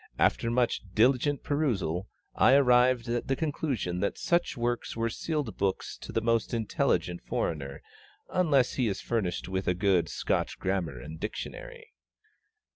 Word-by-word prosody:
after 115 - +2
much 120 0 +1
diligent 130 +5 +3
perusal, 100 - -1 0.3
I 130 - +5
arrived 125 -2 +4
at 120 0 -2
the 135 - +1
conclusion 135 - -2
that 100 - -1
such 170 -4 0
works 120 -1 -2
were 115 0 0
sealed 150 -6 -3
books 95 -1 -1
to - - -8
the 115 - 0
most 115 0 +1
intelligent 100 -5 0
foreigner, 70 -4 -3 0.4
unless 150 -9 +2
he 125 -3 +1
is 100 - -2
furnished 100 -7 -2
with 95 0 -3
a 90 - +2
good 95 -2 +2
Scotch - - -1
grammar 90 -9 -2
and 80 +6 -9
dictionary. - - -7
115 Hz, 145 wpm, -29 LUFS, 95-130 Hz, 0.4 s, I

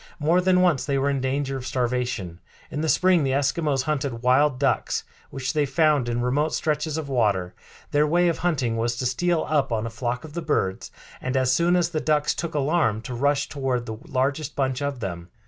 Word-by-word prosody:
More 165 +4 +2
than 180 0 +3
once 175 -7 +3
they 140 -2 0
were 140 +1 +1
in 135 -2 -1
danger 135 +1 -1
of 130 -1 -6
starvation. 120 -9 -2 0.3
In 150 - -3
the 160 - 0
spring 185 -2 +4
the 135 -1 0
Eskimos 140 0 +1
hunted 135 -5 -2
wild 130 +2 +3
ducks, 135 -2 0 0.3
which 130 -2 -3
they 150 -2 +1
found 145 -3 +2
in 120 0 -1
remote 145 +5 +1
stretches 155 0 -1
of 160 -3 -4
water. 105 -9 0 0.4
Their 150 +1 +3
way 175 +3 +3
of 170 - 0
hunting 135 -10 0
was 120 +1 0
to 125 - -3
steal 165 +7 +1
up 145 -5 +1
on 110 -1 -1
a 115 - -5
flock 120 +1 -3
of 155 -2 -10
the 170 - -3
birds, 95 - -1 0.3
and, 130 +1 -1
as 130 -1 +2
soon 170 +4 +3
as 175 -1 +2
the 160 -3 -2
ducks 150 -1 +1
took 170 -2 -5
alarm, 140 -7 +1
to 120 +3 -7
rush 140 +3 +1
toward 130 -4 -2
the 110 -1 -6
largest 140 +3 -1
bunch 130 -1 -1
of 140 -3 -3
them. 85 -4 -5
140 Hz, 215 wpm, -24 LUFS, 125-155 Hz, 0.4 s, spring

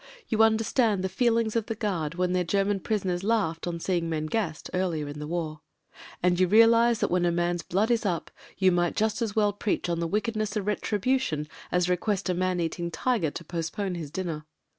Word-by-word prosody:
You 220 -2 +2
under 225 0 +4
stand 220 -5 +1
the 190 - 0
feelings 230 +2 +1
of 225 -2 0
the 225 - -2
guard 175 -8 -2
when 180 0 0
their 180 0 +2
German 195 +3 +1
prisoners 190 -3 -1
laughed 195 -7 0
on 170 -1 -3
seeing 170 -1 -1
men 155 -1 -1
gassed 165 -3 -2
— - - -32
earlier 170 -5 -1
in 145 +1 -7
the 150 - -5
war. 155 -2 -3 0.6
And 180 0 +3
you 185 - +4
realise 230 +3 +5
that - - +1
when 180 0 +2
a 175 - +3
man's 175 0 0
blood 205 +7 0
is 235 -2 +2
up, 180 -5 -2 0.3
you 190 -1 +4
might 175 -1 +1
just 220 +2 0
as 220 -3 -1
well 210 -2 +3
preach 205 -3 -1
on 170 -1 0
the 170 - -1
wickedness 215 +1 -1
:>f 200 - -2
retribution 210 - 0 0.2
as 180 0 +2
request 190 +2 0
a - - +2
man 185 0 0
eating 170 +1 -2
tiger 220 -3 0
to 170 +3 -8
post 165 0 -4
pone 200 -3 -2
his 165 -4 -5
dinner. 160 -3 -4
185 Hz, 220 wpm, -27 LUFS, 170-215 Hz, 0.6 s, realise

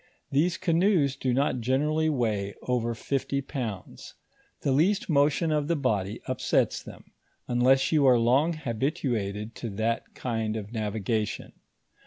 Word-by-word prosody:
These 165 +6 +2
canoes 170 -5 +2
do 130 -2 -1
not 130 0 +1
generally 150 +6 +1
weigh 110 -8 -1
ovor 120 -2 -1
fifty 135 +3 -2
pounds; 120 - -6 0.5
the 140 - 0
least 195 - +2
motion 150 +3 +3
of 150 -1 0
the 170 - +1
body 110 -7 -1
upsets 130 -2 +1
them, - - -13 0.4
imless 130 +2 +3
you 150 -4 +4
are 125 -2 +6
long 130 +8 +3
habituated 115 - -2
to 115 - -5
that 115 +2 -2
kind 115 -3 -2
of 105 +1 -7
navigation. 110 0 -2
130 Hz, 135 wpm, -27 LUFS, 110-150 Hz, 0.5 s, are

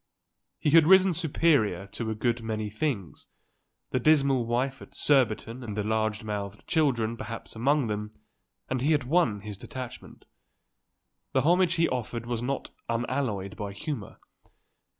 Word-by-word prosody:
He 150 - 0
had 160 0 +7
risen 190 0 +6
superior 150 - +2
to 115 -2 -3
a 110 - -2
good 120 +2 0
many 110 -2 -3
things, 110 - -3 0.6
the 130 - +1
dismal 135 -3 +3
wife 130 +3 -1
at - - -13
Surbiton 125 -3 +2
and 105 -3 -6
the 105 - 0
large 110 0 0
mouthed 105 -1 -5
children 120 -8 +1
perhaps 115 -2 -7
among 140 +4 +2
them, 105 -1 -3 0.6
and 130 -1 -2
he 150 +4 +3
had 145 -3 +1
won 125 - +2
his 105 -1 -7
detachment. 130 -2 -8 1.1
The - - +3
homage 175 +2 +4
he 165 0 +3
offered 120 -2 -3
was 120 -1 -2
not 135 +2 -3 0.2
unalloyed 115 -5 -2
by 100 -1 -5
humour. 115 -1 -5
120 Hz, 150 wpm, -28 LUFS, 110-145 Hz, 1.1 s, had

